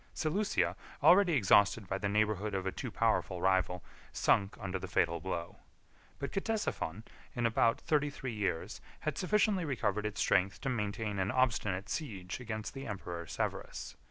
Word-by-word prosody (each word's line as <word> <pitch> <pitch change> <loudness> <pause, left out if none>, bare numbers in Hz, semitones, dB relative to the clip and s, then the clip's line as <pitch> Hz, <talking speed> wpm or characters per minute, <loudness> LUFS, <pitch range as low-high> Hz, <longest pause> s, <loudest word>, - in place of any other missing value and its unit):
42 - - -28
Seleucia, 190 +6 +1 0.3
already 185 -1 +7
exhausted 100 -3 +4
by 95 +1 -2
the 100 - -1
neighborhood 105 -1 +1
of 95 -1 -2
a 95 - 0
too - - -5
powerful - - +1
rival, 95 -1 +1 0.3
sunk 100 0 +2
under 95 -1 -3
the - - -6
fatal 85 - +1
blow; 85 -1 -4 0.6
but 140 - -4
Ctesiphon, 195 - -2 0.3
in 120 -2 0
about 115 0 +3
thirty 150 -3 +1
three 135 -3 -5
years, 100 -6 -2 0.2
had - - -2
sufficiently 205 0 +2
recovered 105 -8 0
its 105 - -6
strength 95 0 +2
to 135 - -1
maintain 105 -3 -2
an 95 +1 +1
obstinate 105 -6 +1
siege 100 - -4
against 110 -3 -5
the 135 0 -6
emperor 90 -5 -5
Severus. - - -4
105 Hz, 160 wpm, -33 LUFS, 95-135 Hz, 0.6 s, already